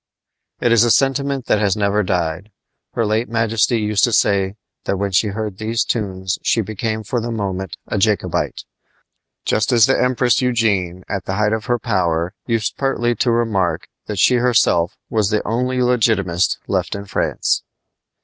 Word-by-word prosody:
It 120 - +2
is 115 -1 +6
a 120 - +2
sentiment 135 +1 +1
that 105 - +2
has 105 -1 +1
never 100 0 +1
died. 90 0 -2 0.4
Her 115 - 0
late 110 +3 0
majesty 115 +1 +1
used 105 -1 0
to 120 - -2
say 100 -2 +2 0.3
that 100 - -1
when 100 +1 -2
she 95 +4 +2
heard 105 -1 -4
these 115 +2 -1
tunes 95 -4 -2
she 115 - +1
became 110 +1 -3
for 120 +3 -2
the 120 - -4
moment 95 -5 -4
a - - -2
Jacobite; - - 0 0.8
just 105 +2 +1
as 115 -3 +6
the 135 - +2
Empress 125 -1 +2
Eugenie 100 -8 0
at 95 -2 -4
the 95 - -2
height 105 +1 +1
of 110 0 -2
her 120 -1 +1
power 90 -6 -1
used 115 -3 -1
pertly 120 -3 0
to 125 - +2
remark 110 -6 0 0.2
that 105 - -4
she 125 +6 +4
herself 115 -8 +2
was 105 -3 +1
the 105 -1 -1
only 125 +3 0
Legitimist 110 -8 +1
left - - -1
in 100 0 -6
France. - - 0
110 Hz, 170 wpm, -19 LUFS, 100-120 Hz, 0.8 s, is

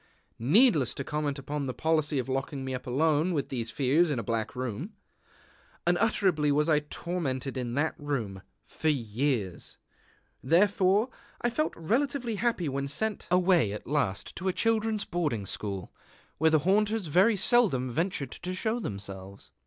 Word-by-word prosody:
Needless 155 - +4
to 140 - -3
comment 150 0 -2
upon 140 +1 -4
the 130 - -4
policy 155 -2 +1
of 130 - -1
locking 135 +1 -3
me 130 - -3
up 130 - -5
alone 155 +6 +2
with 140 - -1
these 115 -3 -3
fears 145 +7 +2
in 145 - -1
a 115 - -2
black 115 +2 -2
room. 130 - -4 0.9
Unutterably 175 -5 +2
was 150 +2 +2
I 155 -2 +4
tormented 150 -4 -3
in 125 -2 -3
that 155 +3 +1
room 120 -10 -3 0.2
for 160 - -4
years! 115 - -1 0.6
Therefore 195 - +3 0.3
I 240 - +1
felt 305 +6 -1
relatively 240 - 0
happy 225 -7 0
when 140 0 -2
sent 210 +10 -2
away 180 - +3
at 105 - -7
last 130 -9 -1
to 190 - -3
a 185 - +2
children's 220 -1 +1
boarding 150 - -1
school, 100 -1 -5 0.5
where 160 +1 +5
the 155 - +4
haunters 210 +2 +2
very 185 +8 +4
seldom 190 - +3
ventured 155 -3 -2
to 180 +1 -5
show 220 +5 -1
themselves. 100 - -6
150 Hz, 155 wpm, -29 LUFS, 130-185 Hz, 0.9 s, where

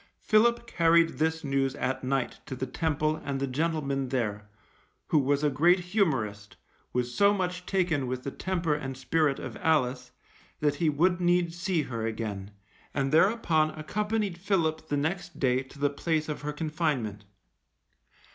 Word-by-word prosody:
Philip 235 +2 +3
carried 165 -5 +3
this 160 +1 0
news 135 -1 0
at 130 +1 -2
night 130 -1 -1
to 130 - -4
the 130 - -3
Temple 155 +2 0
and 140 -1 -2
the 140 - 0
gentleman 140 -1 -1
there, 105 -5 -2 0.6
who 155 - +4
was 140 +1 +1
a 150 - +4
great 170 +7 +4
humorist, 140 - -1 0.4
was 125 0 -1
so 200 +5 +4
much 180 -1 -3
taken 170 -8 +1
with 125 0 -3
the 140 - -4
temper 175 -3 -1
and 135 -3 -4
spirit 145 +2 +1
of - - -7
Alice, 130 -5 +1 0.5
that 150 -1 +2
he 165 0 +2
would 175 +5 +2
needs 175 -1 +2
see 175 -3 0
her 115 -4 -4
again, 105 -3 -4 0.5
and 135 -1 0
thereupon 165 -3 +3
accompanied 210 +2 -2
Philip 160 -5 0
the 145 - 0
next 160 +6 -3
day 130 -1 +2
to 135 +2 -14
the 145 0 +1
place 155 +1 -1
of 150 - -4
her 150 0 -3
confinement. 150 - -2
150 Hz, 160 wpm, -28 LUFS, 130-170 Hz, 0.6 s, who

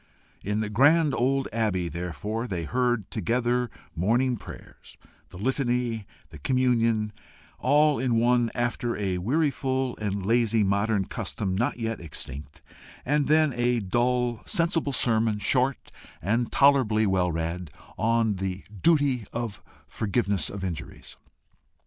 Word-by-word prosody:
In 105 +2 -1
the 105 - -2
grand 145 +6 +4
old 135 +2 +1
Abbey, 105 -6 0
therefore, 90 +8 -4
they 90 -6 -3
heard 120 +1 0
together 125 +1 0 0.3
morning 120 +9 +2
prayers, 110 - -12 0.3
the - - -11
Litany, 125 +1 0
and 110 -3 -6 0.2
the 80 -2 -12
Communion, 115 - +1 0.5
all 150 0 +3
in 125 -2 +1
one, 120 0 +3
after 120 0 -1
a 95 -3 -1
weariful 130 - 0
and 100 -2 -3
lazy 115 0 +3
modern 100 +1 +1
custom 95 -3 -3
not 120 +5 0
yet 115 -3 -3
extinct, 70 -3 -8 0.4
and 145 +2 +1
then 155 -2 +4
a 120 0 +1
dull, 120 +3 0
sensible 165 -3 +1
sermon, 110 -4 +1
short, 130 +6 +1 0.3
and 115 +7 0
tolerably 130 -6 +4
well 95 -3 +1
read, 85 +1 -3 0.3
on 115 -2 +1
the 95 0 -4 0.2
duty 145 -8 +3
of 115 -4 -4 0.3
forgiveness 100 -4 -1
of 100 -1 -6
injuries. 90 -4 -6
115 Hz, 130 wpm, -26 LUFS, 100-125 Hz, 0.5 s, grand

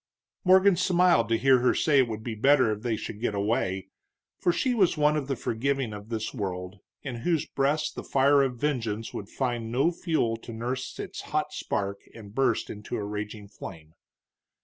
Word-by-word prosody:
Morgan 190 +1 +6
smiled 180 - +3
to 115 - +3
hear 130 +1 +5
her 125 - +3
say 145 -3 +3
it 130 - +4
would 110 -1 -5
be 115 - -3
better 130 +1 +4
if 105 0 -4
they 120 -1 0
should 105 0 -7
get 110 -4 -1
away, 100 -2 -1 0.5
for 175 - +3
she 250 +8 0
was 190 -8 +3
one 150 0 +3
of 145 -3 -2
the 135 - -1
forgiving 125 0 -1
of 105 +1 -9
this 110 -2 -3
world, 95 -4 -4 0.2
in 130 -4 -4
whose 165 +5 0
breast 150 +3 0
the - - -6
fire 140 +1 +4
of 130 -3 0
vengeance 115 -6 -2
would 100 - -6
find 120 -4 -2
no 135 +8 +3
fuel 160 -10 0
to 115 - -10
nurse 125 +3 -4
its - - -6
hot - - -2
spark 100 0 -3
and 105 -3 -11
burst 130 -3 +1
into 105 +3 -5
raging 105 0 -5
flame. 80 -6 -10
120 Hz, 190 wpm, -27 LUFS, 105-140 Hz, 0.5 s, Morgan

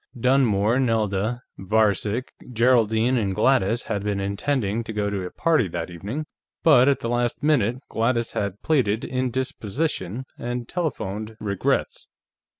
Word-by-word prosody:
Dunmore, 120 -3 +3
Nelda, 110 -1 0 0.2
Varcek, 105 +3 +1 0.2
Geraldine 115 0 +3
and 100 -4 -1
Gladys 120 -3 +2
had 100 -3 -3
been 105 -1 -1
intending 105 +2 -1
to 110 - -5
go 105 -1 -1
to 100 -2 -2
a 90 - -4
party 155 - +2
that 90 - -5
evening, 105 - -5 0.4
but 140 -5 +6
at 140 - +1
the - - -2
last 120 +3 -1
minute 125 -6 +2
Gladys 115 0 0
had 100 -1 -3
pleaded 120 -9 +1
indisposition 130 - -2
and 120 0 -4
telephoned 110 - -3
regrets. 100 -3 -1
115 Hz, 135 wpm, -24 LUFS, 100-130 Hz, 0.4 s, but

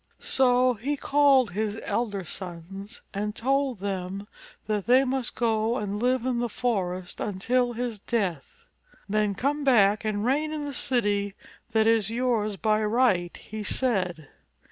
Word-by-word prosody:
So 255 -1 +3
he 270 +7 -3
called 275 -5 +4
his 215 +3 -2
elder 205 -5 -2
sons 190 +5 -7
and 210 +1 -3
told 265 -3 0
them' 195 0 -4 0.4
that 210 -2 -2
they 255 +2 +6
must 265 -2 -2
go 225 0 +1
and 205 -1 -3
live 250 0 +1
in 250 -2 0
the 240 0 -1
forest 185 -7 -2
until 240 +5 0
his 235 -2 -3
death. 230 - -3 0.4
"Then 210 -1 +1
come 285 +7 -1
back 215 -6 +4
and 215 -1 -1
reign 295 +5 +1
in 300 -1 -3
the 285 - -5
city 205 -6 0 0.4
that 220 -1 +4
is 225 -2 +3
yours 225 -4 0
by 215 0 +1
right," 210 -6 +2
he 215 0 -7
said. 185 - 0
220 Hz, 145 wpm, -26 LUFS, 200-250 Hz, 0.4 s, they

